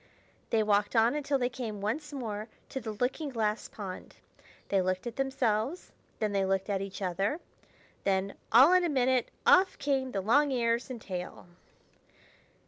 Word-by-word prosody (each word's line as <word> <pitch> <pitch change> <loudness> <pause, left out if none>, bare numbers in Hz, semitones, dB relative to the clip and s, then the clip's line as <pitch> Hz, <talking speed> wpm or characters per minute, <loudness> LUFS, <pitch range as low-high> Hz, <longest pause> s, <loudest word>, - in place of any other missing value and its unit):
They 220 -1 +2
walked 205 +1 +1
on 230 +2 +5
until 290 -1 0
they 245 -2 +1
came 235 -4 -5
once 275 +10 -3
more 220 -6 -4 0.2
to 265 - -4
the 220 -2 -5
looking 260 +7 -2
glass 220 -4 -1
pond. 195 -3 -8 0.5
They 195 -1 +3
looked 185 +2 -1
at 240 -1 -5
themselves; 265 - -1 0.3
then 215 -2 -1
they 200 -1 +1
looked 195 +1 0
at 195 -1 0
each 195 0 -6
other; 195 - -1 0.6
then, 195 0 0 0.2
all 265 +10 +8
in 365 -1 +5
a 345 - +1
minute, 260 -3 +2 0.2
off 375 +1 +5
came 270 -2 0
the 195 - -2
long 280 +9 +4
ears 235 -1 0
and 250 -2 -6
tail. 180 -4 -6
230 Hz, 165 wpm, -30 LUFS, 200-265 Hz, 0.6 s, all